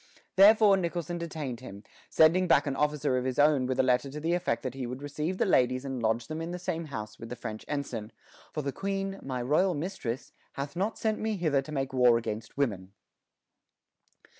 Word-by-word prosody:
Therefore 205 0 +7
Nicholson 175 -1 -3
detained 155 -7 -5
him, 100 -5 -10 0.3
sending 175 +4 +5
back 155 -3 +4
an 140 -2 -2
officer 150 -3 +1
of - - -4
his 130 -1 -2
own 145 -3 +4
with 130 0 -2
a - - +5
letter 130 +2 +2
to 145 +3 -6
the 165 +3 0
effect 175 -10 -1
that 130 -2 -3
he 130 -2 -4
would 125 +2 -5
receive 150 +5 -3
the - - +2
ladies 130 -6 +2
and 135 -3 -4
lodge 115 +1 +1
them 155 +4 -5
in 165 - -4
the 175 - -4
same 175 -2 -3
house 110 -7 -7
with 115 - -8
the 125 - -5
French 110 -2 -6
ensign, 135 -7 -4 0.4
"for 150 - -3
the 140 - -1
queen, 195 +4 -3
my 130 -2 -3
royal 165 +8 +2
mistress, 145 -7 -4 0.2
hath 140 +3 -5
not 200 +5 -1
sent 220 -1 0
me 220 -1 -1
hither 155 -6 +2
to 155 - -10
make 135 -2 -2
war 125 -2 +5
against 110 0 -5
women." 100 -9 -1
140 Hz, 210 wpm, -29 LUFS, 125-170 Hz, 0.4 s, Therefore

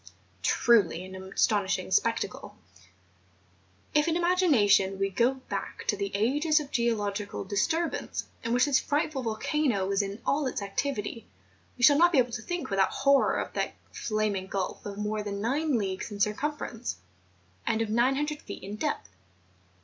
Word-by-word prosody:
Truly 195 -7 +3
an 190 - -10
astonishing 190 +1 0
spec¬ - - +3
tacle! - - -6 1.4
If 300 +1 +3
in 330 - +1
imagination 275 - +3
we 195 0 0
go 235 +7 +2
back - - -5
to - - +3
the 400 -1 -2
ages 295 +9 +2
of 290 -2 -7
geological 210 -5 -1
disturbance 265 - -1 0.2
in 230 - -2
which 245 +1 +4
this 280 -3 +3
frightful 290 -1 -1
volcano 230 -1 0
was 195 +1 +2
in 200 +1 -5
all 285 0 +1
its 255 - -2
activity 230 +2 -3 0.5
we 245 - -4
shall 285 +3 +7
not 345 +1 +6
be - - +4
able 245 -1 +3
to 230 -2 -4
think 350 0 -4
without 195 -1 +3
horror 275 0 +3
of - - -3
that - - -2 0.2
flaming 215 -3 -1
gulf 190 -1 -3
of 200 -1 -6
more 210 +1 -2
than 200 -1 -4
nine 275 +5 +1
leagues 190 -2 -3
in 205 -1 -7
circumference, 235 +2 -2 0.7
and 220 - +1
of 215 - -4
900 270 +6 +1
feet - - -9
in 200 +2 -6
depth. 105 - -2
230 Hz, 160 wpm, -28 LUFS, 200-285 Hz, 1.4 s, shall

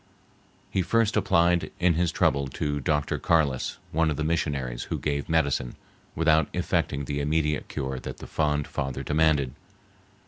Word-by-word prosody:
He 95 - +1
first 115 +4 +2
applied 85 -5 +3
in 90 -1 +4
his 85 +1 +1
trouble 70 -1 +1
to 75 +2 -2
Dr. 75 +1 0
Carliss, 75 -6 +1
one 80 +1 +2
of 75 - -2
the 75 - -1
missionaries, 70 -6 -1
who - - -3
gave 70 0 -2
medicine, 70 -6 +1 0.4
without 80 -1 +3
effecting 70 0 -1
the 70 +1 -2
immediate 75 0 0
cure 65 -1 -4
that - - -7
the - - -9
fond 75 -2 0
father 65 -1 -4
demanded. 75 -3 +2
75 Hz, 150 wpm, -26 LUFS, 70-80 Hz, 0.4 s, in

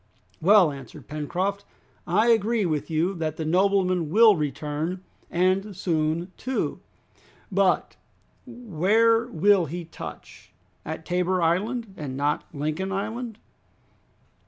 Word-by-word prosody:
"Well!" 185 -2 +6
answered 135 -4 -11
Pencroft, 180 +7 -2 0.4
"I 210 +7 +3
agree 225 -1 +2
with 155 -2 -2
you 165 +4 +1
that 155 -2 -3
the 160 - -3
nobleman 185 -1 +2
will 220 +4 +6
return, 150 +4 -3 0.3
and 185 +2 0
soon 165 0 -1
too. 260 0 -2 0.7
But 195 -1 +1 0.5
where 230 0 +2
will 195 -3 +3
he 170 +3 -5
touch? 165 - -10 0.3
At 160 +1 -6
Tabor 180 +1 0
Island, 205 +6 0
and 135 -3 -5
not 145 +1 0
at - - -16
Lincoln 155 +6 -2
Island." 220 +3 -4
185 Hz, 115 wpm, -25 LUFS, 160-205 Hz, 0.7 s, Well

